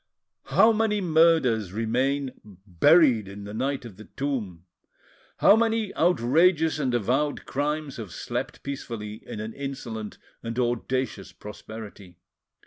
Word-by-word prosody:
How 225 - +5
many 215 -1 +1
murders 160 - +3
remain 130 +5 0
buried 105 - +3
in 100 +1 -9
the 100 +1 -8
night 135 +3 -2
of 105 -6 -11
the 110 - -11
tomb! 110 -12 -4 0.7
how 205 - +6
many 225 -2 0
outrageous 160 +1 +3
and 130 -4 0
avowed 130 +6 0
crimes 145 0 -2
have 110 -6 -7
slept - - -5
peacefully 115 -6 -6
in - - -6
an 110 +1 -5
insolent 120 -6 -6 0.2
and 115 0 -5
audacious 120 -3 -2
prosperity! 105 -3 -10
125 Hz, 125 wpm, -26 LUFS, 110-150 Hz, 0.7 s, how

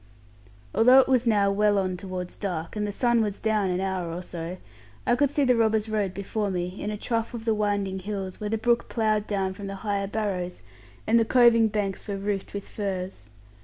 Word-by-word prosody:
Although 250 +3 +6
it 265 - +6
was 255 -2 +2
now 205 -3 +3
well 205 0 +3
on 185 -2 0
towards 180 -1 -6
dark, 175 -4 -4
and 210 0 -1
the - - -2
sun 240 +2 +2
was 205 -2 -1
down 215 -3 +1
an 180 0 0
hour 190 -3 -2
or 175 +2 -5
so, 175 +1 -6 0.5
I 240 - +3
could 285 +2 +2
see 290 +1 +1
the 250 -2 +4
robbers' 220 -1 +2
road 210 -3 0
before 205 +1 -2
me, 180 0 -3
in 205 - -2
a 210 - -3
trough 230 +2 -2
of 225 -1 -7
the 225 - +3
winding 205 -2 -1
hills, 195 -1 -5
where 210 - -3
the 225 - 0
brook 235 +1 +1
ploughed 215 -2 +1
down 195 -2 -1
from 200 +1 -7
the 195 - -5
higher 200 -1 0
barrows, 195 -4 -3 0.4
and 230 +2 +4
the - - +4
coving 235 -2 +5
banks 200 -2 -2
were 200 -1 -2
roofed 200 0 -3
with 200 - -5
furze. 190 - -5
205 Hz, 215 wpm, -26 LUFS, 190-220 Hz, 0.5 s, Although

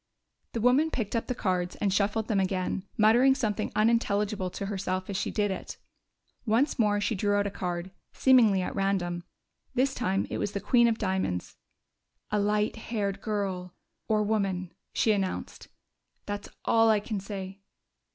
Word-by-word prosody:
The 230 - -2
woman 260 +7 +4
picked 230 -7 -3
up 230 - -1
the 250 - -2
cards 180 -5 -1
and 200 -2 0
shuffled 210 +2 +1
them 210 -4 +1
again, 190 0 -1
muttering 240 +5 +5
something 215 -4 -1
unintelligible 210 -3 +1
to 200 - -5
herself 190 -1 -3
as - - -4
she - - -1
did 205 -2 0
it. 190 - -6 0.7
Once 245 +5 +1
more 205 -2 +3
she 205 +2 0
drew 205 0 +1
out 205 0 +2
a 200 - -2
card, 180 -1 -4 0.2
seemingly 225 -8 +5
at - - -4
random. 185 -3 -1 0.5
This 265 +2 +2
time 195 -6 0
it - - -2
was 205 - -2
the 200 - -1
queen 235 +3 +4
of 225 -1 +1
diamonds. 190 - -2 0.8
"A 210 - +2
light 210 +2 +1
haired 200 -3 -3
girl 190 -4 -3 0.3
or 215 -1 +2
woman," 195 -4 -1 0.2
she 220 - +2
announced. 195 -3 -3 0.6
"That's 205 0 -5 0.2
all 225 0 +4
I 215 -1 +4
can 210 0 -4
say." 195 -1 -7
205 Hz, 165 wpm, -28 LUFS, 190-220 Hz, 0.8 s, muttering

